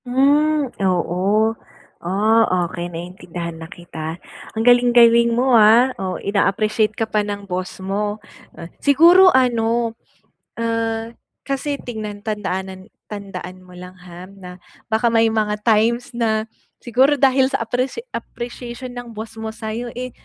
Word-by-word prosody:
Hmm, 290 Hz, +4 st, +2 dB, 0.2 s
oo. 190 Hz, +4 st, +1 dB, 0.5 s
Ah, 200 Hz, 0 st, +2 dB
okey, 175 Hz, 0 st, -5 dB
naintindihan 175 Hz, 0 st, -7 dB
na 160 Hz, -, -9 dB
kita. 165 Hz, -2 st, -7 dB, 0.4 s
Ang 225 Hz, -, 0 dB
galing-galing 240 Hz, -1 st, +5 dB
mo, 255 Hz, +1 st, +2 dB
ah. 230 Hz, +3 st, +6 dB
Oh, 185 Hz, -1 st, -3 dB
ina-appreciate 215 Hz, +2 st, 0 dB
ka 225 Hz, -, 0 dB
pa 215 Hz, -1 st, 0 dB
ng 205 Hz, -1 st, -5 dB
boss 185 Hz, -1 st, -5 dB
mo. 205 Hz, +2 st, -3 dB, 0.6 s
Siguro 340 Hz, +7 st, +6 dB
ano, 235 Hz, -4 st, +1 dB, 0.7 s
ah, 230 Hz, -1 st, -1 dB, 0.4 s
kasi 275 Hz, +1 st, -2 dB
tignan 215 Hz, -4 st, -6 dB
tandaanan 190 Hz, -1 st, -4 dB, 0.2 s
tandaan 185 Hz, -3 st, -8 dB
mo 180 Hz, -, -17 dB
lang, 180 Hz, +1 st, -11 dB
ha, 180 Hz, 0 st, -11 dB
na 185 Hz, -2 st, -12 dB, 0.3 s
baka 220 Hz, +2 st, +2 dB
may 225 Hz, -1 st, +3 dB
mga 210 Hz, -1 st, -1 dB
times 235 Hz, +4 st, +2 dB
na 225 Hz, -3 st, 0 dB, 0.4 s
siguro 260 Hz, +4 st, +3 dB
dahil 265 Hz, -1 st, +3 dB
sa 260 Hz, -, -2 dB
apprecia 255 Hz, -, -3 dB
appreciation 240 Hz, +1 st, -7 dB
ng 245 Hz, -2 st, -9 dB
boss 220 Hz, +1 st, -8 dB
mo 220 Hz, -, -5 dB
sa'yo, 225 Hz, +2 st, -5 dB
eh, 255 Hz, +1 st, -5 dB
220 Hz, 130 wpm, -20 LUFS, 190-245 Hz, 0.7 s, ah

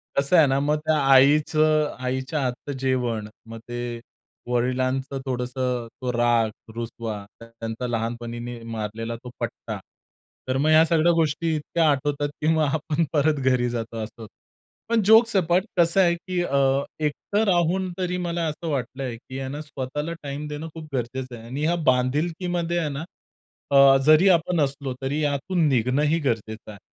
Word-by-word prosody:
कसं 140 Hz, +6 st, +2 dB
आहे 155 Hz, -, +7 dB
ना, 135 Hz, +1 st, +2 dB
मग 150 Hz, +2 st, +1 dB
त्या 155 Hz, 0 st, +3 dB
आईचं 150 Hz, +3 st, +4 dB
आईच्या 130 Hz, +4 st, -2 dB
हातचं 125 Hz, +2 st, -3 dB
जेवण 120 Hz, -5 st, -1 dB, 0.2 s
मग 115 Hz, 0 st, -8 dB
ते 120 Hz, -1 st, -4 dB, 0.5 s
वडिलांचं 130 Hz, +2 st, -1 dB
थोडंस 125 Hz, -1 st, -2 dB
तो 125 Hz, 0 st, -2 dB
राग, 120 Hz, -2 st, +2 dB, 0.3 s
रुसवा, 115 Hz, -3 st, -5 dB
त्यांचा 115 Hz, +1 st, -6 dB
लहानपणीने 120 Hz, +1 st, -4 dB
मारलेला 115 Hz, +1 st, -4 dB
तो 125 Hz, -, -7 dB
पट्टा. -, -, -5 dB, 0.7 s
तर 130 Hz, +1 st, 0 dB
मग 150 Hz, +3 st, +2 dB
ह्या 155 Hz, +1 st, +7 dB
सगळ्या 165 Hz, +1 st, +3 dB
गोष्टी 160 Hz, 0 st, +1 dB
इतक्या 155 Hz, +1 st, +1 dB
आठवतात, 145 Hz, +1 st, -1 dB
की 155 Hz, -, 0 dB
मग 160 Hz, -1 st, +2 dB
आपण 160 Hz, +1 st, 0 dB
परत 150 Hz, -1 st, +2 dB
घरी 125 Hz, -2 st, +2 dB
जातो 115 Hz, -1 st, -4 dB
असं. 110 Hz, +1 st, -9 dB, 0.6 s
पण 230 Hz, -2 st, +3 dB
जोक्स 225 Hz, 0 st, +6 dB
अपार्ट 180 Hz, +2 st, +2 dB
कसं 170 Hz, +3 st, +4 dB
आहे, 170 Hz, -1 st, +3 dB
की 180 Hz, 0 st, -3 dB
अ, 140 Hz, -2 st, +2 dB, 0.2 s
एकटं 155 Hz, +8 st, -1 dB
राहून 180 Hz, +1 st, +1 dB
तरी 180 Hz, -1 st, -1 dB
मला 170 Hz, -1 st, -2 dB
असं 160 Hz, +2 st, -4 dB
वाटलंय, 130 Hz, -2 st, -3 dB
की 130 Hz, +2 st, -9 dB
आहे 130 Hz, 0 st, -4 dB
ना 145 Hz, +2 st, -5 dB
स्वतःला 150 Hz, +2 st, -4 dB
टाईम 145 Hz, +1 st, -5 dB
देणं 150 Hz, +2 st, -5 dB
खूप 160 Hz, -1 st, -9 dB
गरजेचं 125 Hz, 0 st, -3 dB
आहे. 115 Hz, -, -12 dB
आणि 140 Hz, +5 st, -3 dB
या 170 Hz, +1 st, +2 dB, 0.2 s
बांधिलकीमध्ये 170 Hz, +7 st, -1 dB
आहे 160 Hz, -3 st, 0 dB
ना 140 Hz, +3 st, -5 dB, 0.7 s
अ, 135 Hz, -1 st, +7 dB
जरी 155 Hz, +5 st, +6 dB
आपण 170 Hz, -1 st, +2 dB
असलो 140 Hz, -1 st, -2 dB
तरी 140 Hz, +3 st, -1 dB
यातून 155 Hz, +4 st, +1 dB
निघणंही 140 Hz, +6 st, +2 dB
गरजेचं 110 Hz, -5 st, -3 dB
आहे. 100 Hz, -, -12 dB
140 Hz, 160 wpm, -24 LUFS, 125-160 Hz, 0.7 s, आहे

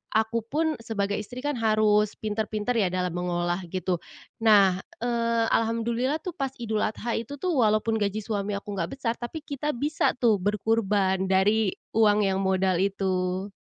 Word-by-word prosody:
aku 220 Hz, +1 st, +2 dB
pun 315 Hz, +2 st, 0 dB
sebagai 205 Hz, -3 st, -2 dB
istri 245 Hz, +5 st, -8 dB
kan 290 Hz, -4 st, -1 dB
harus 215 Hz, -1 st, +3 dB
pintar-pintar 215 Hz, +2 st, -2 dB
ya 200 Hz, -, +3 dB
dalam 180 Hz, -1 st, -1 dB
mengolah 175 Hz, 0 st, -1 dB
gitu. 180 Hz, 0 st, -2 dB, 0.4 s
Nah, 200 Hz, -5 st, +5 dB, 0.2 s
eee, 230 Hz, -1 st, +1 dB
alhamdulillah 235 Hz, +6 st, 0 dB
tuh 360 Hz, -, -3 dB
pas 270 Hz, -3 st, -2 dB
Idul 220 Hz, -3 st, -2 dB
Adha 225 Hz, +2 st, -2 dB
itu 235 Hz, +5 st, -7 dB
tuh, 360 Hz, +6 st, -2 dB
walaupun 220 Hz, -1 st, +2 dB
gaji 210 Hz, +1 st, -1 dB
suami 205 Hz, -1 st, -2 dB
aku 200 Hz, 0 st, -5 dB
enggak 170 Hz, +7 st, -3 dB
besar, 230 Hz, -4 st, 0 dB
tapi 270 Hz, +6 st, -6 dB
kita 295 Hz, 0 st, -3 dB
bisa 290 Hz, +5 st, 0 dB
tuh 230 Hz, -5 st, +3 dB
berkurban 200 Hz, -1 st, +1 dB
dari 195 Hz, +2 st, +2 dB, 0.2 s
uang 210 Hz, -1 st, +4 dB
yang 190 Hz, -1 st, +1 dB
modal 190 Hz, -1 st, +2 dB
itu. 190 Hz, -1 st, -1 dB
215 Hz, 160 wpm, -26 LUFS, 195-235 Hz, 0.4 s, Nah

